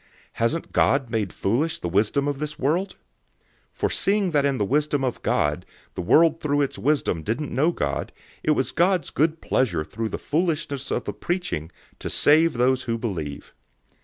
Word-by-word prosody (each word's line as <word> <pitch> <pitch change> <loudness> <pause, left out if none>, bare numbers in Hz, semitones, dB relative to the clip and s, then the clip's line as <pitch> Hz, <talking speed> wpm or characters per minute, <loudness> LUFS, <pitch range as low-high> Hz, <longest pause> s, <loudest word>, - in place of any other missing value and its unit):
Hasn't 115 +9 -1
God 135 -4 +2
made 105 -6 -1
foolish 135 +11 0
the - - -4
wisdom 105 +10 +1
of 145 -1 -2
this 150 0 -4
world? 170 +9 0 0.7
001:021 - - -37
For - - 0
seeing 200 -2 +1
that 145 -3 +2
in 140 -2 +1
the 105 - +1
wisdom 145 +3 +1
of 125 -2 -2
God, 75 +4 0 0.3
the - - -4
world 160 - +4
through 145 -1 +1
its 140 - -2
wisdom 140 - +1
didn't 120 - -3
know 155 +6 +3
God, - - -2 0.3
it 155 - +1
was 130 - 0
God's 180 -2 +1
good 160 +2 +1
pleasure 90 -12 +1
through 110 +9 -4
the - - -4
foolishness 155 -4 -1
of - - -1
the - - -4
preaching 175 - -3 0.3
to - - -4
save 160 +3 +4
those 125 +1 +2
who 115 -1 -1
believe. 85 -11 -5
140 Hz, 180 wpm, -24 LUFS, 115-155 Hz, 0.7 s, world